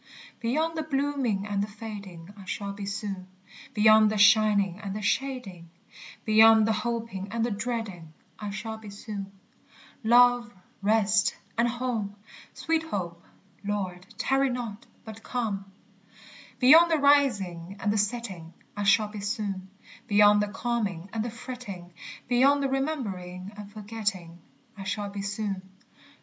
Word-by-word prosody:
_ -, -, -34 dB
Beyond 310 Hz, +8 st, 0 dB
the 320 Hz, -, -1 dB
blooming 275 Hz, -8 st, -1 dB
and 205 Hz, -1 st, -1 dB
the 205 Hz, -, -1 dB
fading 200 Hz, -4 st, -9 dB
I 200 Hz, -2 st, -12 dB
shall 200 Hz, +1 st, -4 dB
be 200 Hz, 0 st, -6 dB
soon; 195 Hz, -2 st, -4 dB, 0.5 s
Beyond 215 Hz, 0 st, +6 dB
the 215 Hz, -, -1 dB
shining 205 Hz, -2 st, +5 dB
and 200 Hz, -2 st, -5 dB
the 215 Hz, -, -4 dB
shading, 210 Hz, -9 st, -2 dB, 0.6 s
Beyond 220 Hz, 0 st, +7 dB
the 225 Hz, -, +3 dB
hoping 225 Hz, -3 st, -3 dB
and 230 Hz, +2 st, 0 dB
the 240 Hz, -, -2 dB
dreading, 205 Hz, -7 st, -4 dB, 0.3 s
I 210 Hz, -, -4 dB
shall 220 Hz, +2 st, -5 dB
be 215 Hz, -2 st, -10 dB
soon. 200 Hz, -1 st, -7 dB, 0.7 s
Love, 240 Hz, +1 st, +5 dB, 0.3 s
rest, 215 Hz, +1 st, +3 dB, 0.2 s
and 235 Hz, +1 st, +3 dB
home! 235 Hz, -4 st, -2 dB, 0.3 s
etc. 320 Hz, -, -2 dB, 0.5 s
Beyond 195 Hz, -3 st, -3 dB, 2.6 s
the 320 Hz, +5 st, +7 dB
rising 200 Hz, -11 st, +2 dB
and 205 Hz, -, +1 dB
the -, -, 0 dB
setting 200 Hz, -6 st, -3 dB, 0.2 s
I 205 Hz, -, -3 dB
shall 215 Hz, +1 st, +4 dB
be 210 Hz, 0 st, -7 dB
soon; 200 Hz, -2 st, -3 dB, 0.4 s
Beyond 205 Hz, 0 st, +6 dB
the 210 Hz, -, 0 dB
calming 205 Hz, -5 st, -3 dB
and 220 Hz, -1 st, -1 dB
the 240 Hz, -, -3 dB
fretting, 225 Hz, -7 st, -8 dB, 0.3 s
Beyond 275 Hz, +4 st, +4 dB
remembering 200 Hz, -10 st, -3 dB
and 205 Hz, -1 st, -9 dB
forgetting, 205 Hz, -5 st, -4 dB, 0.4 s
I 195 Hz, -, -8 dB
shall 200 Hz, +1 st, -3 dB
be 200 Hz, 0 st, -5 dB
soon. 200 Hz, -1 st, -3 dB
210 Hz, 130 wpm, -27 LUFS, 195-235 Hz, 2.6 s, Beyond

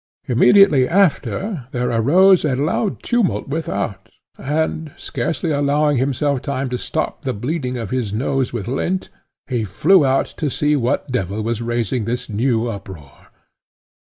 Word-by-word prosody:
Immediately 140 Hz, -, +5 dB
after 190 Hz, -, 0 dB
there 125 Hz, -1 st, -1 dB
arose 175 Hz, -, +5 dB
a 145 Hz, -4 st, +1 dB
loud 160 Hz, -, -1 dB
tumult 240 Hz, -, 0 dB
without, 105 Hz, -8 st, -3 dB, 0.3 s
and, 155 Hz, +2 st, -2 dB
scarcely 155 Hz, +6 st, -3 dB
allowing 145 Hz, 0 st, +2 dB
himself 140 Hz, +1 st, 0 dB
time 135 Hz, -2 st, -3 dB
to 125 Hz, -, -1 dB
stop 155 Hz, -, -3 dB
the 135 Hz, -4 st, -2 dB
bleeding 125 Hz, +2 st, -3 dB
of 115 Hz, -4 st, -5 dB
his 125 Hz, -6 st, -1 dB
nose 130 Hz, +4 st, -1 dB
with 110 Hz, -5 st, -5 dB
lint, 175 Hz, +9 st, -2 dB, 0.4 s
he 120 Hz, -4 st, -2 dB
flew 155 Hz, -, +3 dB
out 135 Hz, 0 st, +2 dB
to 150 Hz, -, -1 dB
see 150 Hz, +3 st, +1 dB
what 130 Hz, +1 st, -1 dB
devil 105 Hz, -3 st, -2 dB
was 115 Hz, 0 st, -2 dB
raising 120 Hz, -1 st, -1 dB
this 125 Hz, +2 st, -3 dB
new 115 Hz, +2 st, 0 dB
uproar. 95 Hz, -10 st, -9 dB
130 Hz, 145 wpm, -19 LUFS, 115-150 Hz, 0.4 s, Immediately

